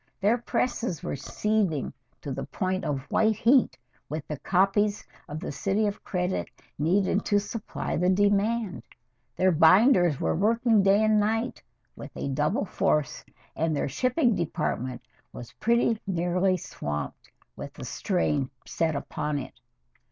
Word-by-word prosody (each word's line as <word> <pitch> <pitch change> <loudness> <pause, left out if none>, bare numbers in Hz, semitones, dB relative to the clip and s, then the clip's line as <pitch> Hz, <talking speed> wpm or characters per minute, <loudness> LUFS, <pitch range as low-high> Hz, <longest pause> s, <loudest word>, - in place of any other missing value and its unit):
Their 220 +5 +2
presses 240 - -2
were - - -3
seething 180 +2 -1 0.3
to 140 - -5
the 130 - -4
point 185 -1 -2
of 140 -3 -2
white 220 0 +3
heat 235 - +3 0.3
with 155 0 -5
the 150 -2 -5
copies 200 +2 +1 0.2
of 150 +1 -5
"The 180 - -5
City 195 +9 0
of 205 0 -3
Credit" 180 0 -2 0.3
needed 190 +5 +2
to 205 - +3
supply 210 +2 -4
the 180 +2 +2
demand; 205 - +1 0.5
their 185 0 +3
binders 175 - +5
were - - 0
working 225 +3 +3
day 195 +2 +4
and 215 -1 +4
night 225 +4 -1 0.3
with - - -9
a - - -3
double 150 - 0
force, 150 -6 0 0.3
and 160 -1 0
their - - -1
shipping 250 - +1
department 145 -7 -2 0.3
was 120 - -9
pretty 235 -1 +2
nearly 180 +1 +1
swamped 75 - -6 0.3
with - - -7
the - - -8
strain 150 -8 -1 0.3
put 160 -2 +2
upon 150 +1 -3
it. 135 - -6
185 Hz, 145 wpm, -27 LUFS, 150-215 Hz, 0.5 s, binders